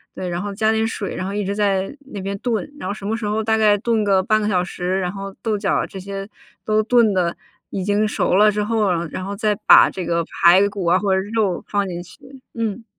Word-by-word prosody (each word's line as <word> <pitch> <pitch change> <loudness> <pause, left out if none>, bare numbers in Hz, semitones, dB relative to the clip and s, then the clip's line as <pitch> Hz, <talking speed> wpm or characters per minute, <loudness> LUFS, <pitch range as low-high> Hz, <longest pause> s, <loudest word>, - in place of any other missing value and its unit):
对， 180 -1 -4
然 175 +1 -3
后 200 0 -5
加 220 +1 +2
点 220 0 +1
水， 205 -3 -4
然 185 - -4
后 200 - -4
一 205 0 -1
直 200 +1 -2
在 200 +2 0 0.2
那 200 - -5
边 200 +1 -4
炖， 245 +4 -2
然 - - -4
后 - - -1
什 210 - -11
么 220 +2 -1
时 235 - -5
候 215 +1 -1
大 220 0 +1
概 210 -1 +4
炖 225 +1 0
个 190 -2 +3
半 215 +2 +2
个 210 - -1
小 185 -4 +1
时， 180 +1 -3
然 180 0 -2
后 195 -1 -7
豆 220 -2 -1
角 200 -1 0
这 190 - -9
些 195 +1 -6 0.4
都 215 0 +2
炖 230 -1 +3
得 175 -2 0 0.3
已 190 - -4
经 205 +2 +1
熟 210 - 0
了 210 +1 +6
之 210 0 -1
后， 215 -2 +1
然 170 -2 -1
然 185 - -5
后 200 +1 -4
再 210 0 +1
把 - - +8
这 185 -2 -5
个 170 0 0
排 180 +5 +4
骨 200 -3 -5
啊， 175 +2 +4
或 195 0 0
者 190 - +2
肉 205 -6 0
放 200 -1 0
进 175 0 -5
去， 265 +9 -15
嗯。 225 0 -3
200 Hz, 275 characters per minute, -20 LUFS, 190-215 Hz, 0.4 s, 把